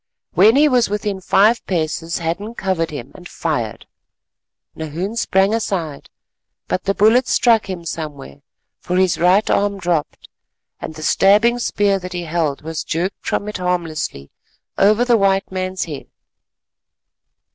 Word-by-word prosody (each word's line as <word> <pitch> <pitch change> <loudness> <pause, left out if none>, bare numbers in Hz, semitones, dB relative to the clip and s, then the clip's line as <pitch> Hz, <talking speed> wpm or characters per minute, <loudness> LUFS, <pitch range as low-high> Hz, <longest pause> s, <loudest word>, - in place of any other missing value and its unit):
When 210 +7 +5
he 295 +2 +5
was 250 -6 +2
within 205 -2 -3
five 215 +5 +3
paces 165 -1 -2
Hadden 180 +7 -4
covered 185 -6 -1
him 140 -4 -8
and 180 -1 -12
fired. 120 -10 -3 0.9
Nahoon 165 +7 -4
sprang 195 -2 +2
aside, 180 -10 -3 0.6
but 185 - -2
the 195 - 0
bullet 225 +5 +4
struck 230 -4 +3
him 175 -3 -5
somewhere, 150 - -7 0.4
for 180 - -3
his 185 -2 +2
right 185 +5 +4
arm 200 0 +1
dropped, 170 -5 -2 0.5
and 155 - -7
the 155 - -8
stabbing 215 +8 +4
spear 205 -4 +1
that 180 0 -8
he 175 -1 -3
held 160 -4 -2
was 160 0 -4
jerked 180 +4 -3
from 205 - -1
it 210 - -4
harmlessly 165 - -3 0.4
over 210 +5 +3
the 240 -2 +4
white 195 -1 +1
man's 185 0 -2
head. 150 -5 -8
185 Hz, 145 wpm, -19 LUFS, 165-205 Hz, 0.9 s, When